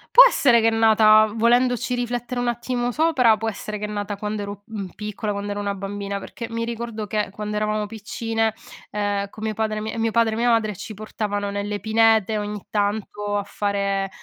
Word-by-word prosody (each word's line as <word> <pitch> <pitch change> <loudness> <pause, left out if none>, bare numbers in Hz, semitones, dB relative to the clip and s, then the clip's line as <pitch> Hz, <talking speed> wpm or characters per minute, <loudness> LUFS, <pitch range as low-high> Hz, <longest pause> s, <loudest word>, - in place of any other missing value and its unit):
Può - - +12
essere 240 -4 +4
che 225 0 +4
è - - -2
nata 220 -1 +5
volendoci 245 +2 +2
riflettere 245 0 -2
un 245 - -1
attimo 240 +1 -1
sopra, 255 -7 +3
può 225 - -3
essere 215 0 -4
che 210 - -4
è - - -4
nata 205 -1 -4
quando 210 +1 -3
ero, 200 0 -7
mhmm, 205 -4 -5
piccola, 210 0 -4
quando 200 0 -4
ero 205 - -3
una 200 -1 -2
bambina, 200 0 -4
perché 230 +3 -7
mi 230 0 -2
ricordo 230 -2 -4
che 210 0 -1
quando 210 +2 -5
eravamo 215 0 0
piccine, 225 +1 -2 0.3
ehm, 205 -1 -1
con 215 - -10
mio 220 0 -1
padre 215 0 -1
mi 220 - -4
mio 225 0 +1
padre 225 0 +2
e 220 - -3
mia 240 +1 +2
madre 220 -3 +2
ci 210 +3 -8
portavano 205 -1 -3
nelle 205 +1 -3
pinete 220 0 +3
ogni 210 -1 -5
tanto, 205 0 -1
a 205 - -1
fare 200 -1 -1
215 Hz, 200 wpm, -23 LUFS, 205-225 Hz, 0.3 s, Può